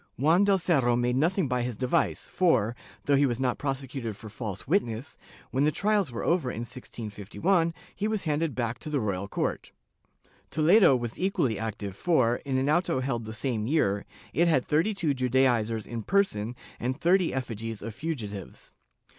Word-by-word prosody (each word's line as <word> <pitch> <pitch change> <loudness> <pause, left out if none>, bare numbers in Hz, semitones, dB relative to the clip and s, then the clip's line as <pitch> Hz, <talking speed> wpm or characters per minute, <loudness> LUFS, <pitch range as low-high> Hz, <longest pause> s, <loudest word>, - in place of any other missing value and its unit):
Juan 160 +8 +4
del 200 -1 +4
Cerro 140 -9 +2
made 120 +1 +1
nothing 165 +4 +2
by 125 -1 0
his 120 -3 -3
device 130 +7 0
for, 120 - +2 0.3
though 145 - +4
he 140 0 +4
was 120 -1 -2
not 125 -2 0
prosecuted 135 -5 -3
for 110 - -9
false 105 -3 -6
witness, 130 - 0 0.4
when 135 - +1
the 150 - +3
trials 200 -3 +1
were 115 - -4
over 165 -7 +1
in 115 - -4
1651, 120 - -1 0.2
he 210 - -1
was 215 -2 -1
handed 155 -1 0
back 120 -1 -2
to 155 - -6
the 145 -2 0
royal 100 -3 -2
court.^ - - -2 0.8
Toledo 160 0 +5
was 120 -2 -4
equally 140 - 0
active 105 -3 -4
for, 125 - +2
in 135 -2 -2
an 135 +1 +1
auto 155 -3 +2
held 120 -4 -2
the 110 - -6
same 110 -1 -2
year, 105 -9 +1 0.3
it 170 +2 +3
had 145 -7 +3
thirty 165 +8 +1
two 160 -7 +1
Judaizers 125 -4 +1
in 115 -1 -5
person 125 - +1 0.2
and 130 +4 -2
thirty 180 +1 +3
effigies 115 -4 -4
of 115 0 -5
fugitives. 105 - -6
130 Hz, 175 wpm, -28 LUFS, 115-160 Hz, 0.8 s, Toledo